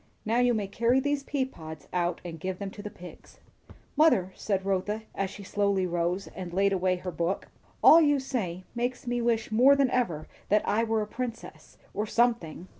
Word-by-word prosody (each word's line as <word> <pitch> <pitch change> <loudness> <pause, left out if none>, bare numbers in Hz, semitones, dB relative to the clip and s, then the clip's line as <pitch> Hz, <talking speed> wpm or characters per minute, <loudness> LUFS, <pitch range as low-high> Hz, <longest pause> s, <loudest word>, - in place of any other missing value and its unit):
Now 225 +3 +1
you 245 -1 +3
may 210 -2 -1
carry 235 +6 +2
these 285 +1 0
pea 275 -1 -1
pods 160 - -10
out 175 -1 -1
and 165 -2 -7
give 185 +2 -4
them 200 0 -5
to 205 - -9
the 210 - -6
pigs." 180 -3 -13 0.6
"Mother," 210 - +4
said 195 -2 -2
Rotha 195 +3 -1
as 195 -1 -2
she 200 - -10
slowly 200 -1 0
rose 175 +2 -1
and 180 -2 -6
laid 195 +2 +2
away 185 -1 +1
her 180 0 -5
book, 170 +3 -2 0.3
"all 330 - +9
you 290 -2 +3
say 195 -10 -3
makes 245 +1 -3
me 245 0 -1
wish 230 -2 0
more 255 +6 +6
than 275 -2 +2
ever 175 -12 -1 0.2
that 210 +1 +2
I 225 +2 +2
were 225 -1 0
a - - -7
princess, 235 0 -7 0.2
or 210 +1 -2
something." 230 -8 0
205 Hz, 195 wpm, -28 LUFS, 185-245 Hz, 0.6 s, all